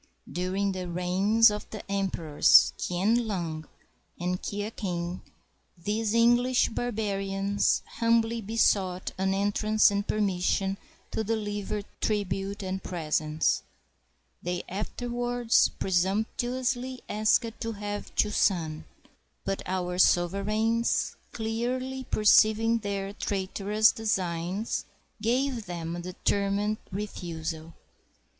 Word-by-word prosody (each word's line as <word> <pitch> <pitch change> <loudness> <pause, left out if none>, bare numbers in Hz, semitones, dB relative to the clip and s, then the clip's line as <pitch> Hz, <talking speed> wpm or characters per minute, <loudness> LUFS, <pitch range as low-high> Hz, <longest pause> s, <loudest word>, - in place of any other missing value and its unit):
During 185 +5 -1
the 185 -2 -4
reigns 190 +6 +4
of 210 - -5
the 215 - -7
emperors 190 -6 +4
Kien 215 +7 +1
lung 165 -6 -3 0.5
and 180 +1 -2
Kia 205 +1 -3
king 180 -4 -4 0.6
these 210 +5 -1
English 240 +2 +4
barbarians 200 -4 0
humbly 230 0 +1
besought 195 -4 +1
an 190 0 +1
entrance 210 +2 +3
and 200 +1 -1
permission 195 -1 0 0.3
to 220 - -1
deliver 210 -1 -2 0.2
tribute 200 -1 -1
and 190 0 -3
presents; 155 -3 0 0.8
they 175 0 -3
afterwards 240 +4 +1
presumptuously 245 +7 -1
asked 215 +2 +1
to 230 -1 -2
have 205 0 -6
Chu 210 - +2
san; 160 -7 +1 0.6
but 195 0 -1
our 180 -1 -2
sovereigns, 210 +7 +2 0.2
clearly 250 +4 -3
perceiving 220 +2 +4
their 200 -2 -3
traitor 195 0 -3
ous 215 +1 +6
designs, 190 -1 -2 0.4
gave 245 0 0
them 170 -1 -4
a - - -5
determined 200 +3 0
refusal. 165 -5 -5
205 Hz, 100 wpm, -28 LUFS, 185-225 Hz, 0.8 s, ous